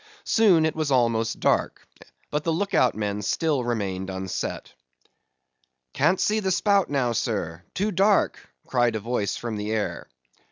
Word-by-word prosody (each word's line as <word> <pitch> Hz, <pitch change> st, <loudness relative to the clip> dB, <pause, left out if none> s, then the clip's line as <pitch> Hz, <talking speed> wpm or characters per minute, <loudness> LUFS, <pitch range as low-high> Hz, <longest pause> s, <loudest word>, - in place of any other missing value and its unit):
Soon, 190 Hz, -8 st, +4 dB
it 160 Hz, -, -1 dB
was 155 Hz, -2 st, -1 dB
almost 115 Hz, -4 st, +1 dB
dark, -, -, 0 dB, 0.4 s
but 150 Hz, 0 st, -1 dB
the 165 Hz, -, 0 dB
look 195 Hz, +4 st, -2 dB
out 125 Hz, -, +3 dB
men 105 Hz, -1 st, -2 dB
still 145 Hz, +5 st, 0 dB
remained 100 Hz, -5 st, -2 dB
unset. 95 Hz, 0 st, -4 dB, 1.2 s
"Can't 165 Hz, +6 st, +2 dB
see 215 Hz, +1 st, +2 dB
the 195 Hz, -3 st, -1 dB
spout 200 Hz, +1 st, +2 dB
now, 135 Hz, -4 st, 0 dB
sir;—too 110 Hz, -, -2 dB
dark"—cried 165 Hz, -, +1 dB
a -, -, -1 dB
voice 110 Hz, -1 st, -2 dB
from 115 Hz, -3 st, -4 dB
the 105 Hz, +1 st, -4 dB
air. 110 Hz, -2 st, -3 dB
125 Hz, 145 wpm, -25 LUFS, 105-165 Hz, 1.2 s, Soon